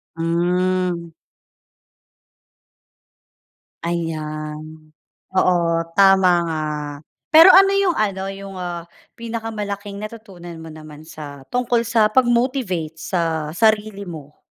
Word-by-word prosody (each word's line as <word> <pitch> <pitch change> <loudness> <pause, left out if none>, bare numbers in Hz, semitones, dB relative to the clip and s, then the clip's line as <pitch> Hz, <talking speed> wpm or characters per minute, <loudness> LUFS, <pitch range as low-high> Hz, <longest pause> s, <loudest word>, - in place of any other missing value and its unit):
Hmm. 175 +1 0 2.8
Ayan, 155 -2 -4 0.6
oo 185 -1 +3 0.4
tama 195 -1 +6 0.2
nga. 160 -2 -2 0.7
Pero 325 +4 +10
ano 390 +1 +7
yung 390 -4 +2
ano, 195 -2 -1
yung 195 0 -8
ah, 175 -1 -5 0.3
pinakamalaking 210 -3 -5
natutunan 205 -5 -9
mo 160 - -9
naman 155 -1 -12
sa, 150 -3 -10
tungkol 245 -1 +1
sa 230 -2 +2
pag-motivate 240 - +1
sa 165 -4 -1
sarili 215 -2 +1
mo? 150 -4 -10
185 Hz, 90 wpm, -20 LUFS, 165-220 Hz, 2.8 s, Pero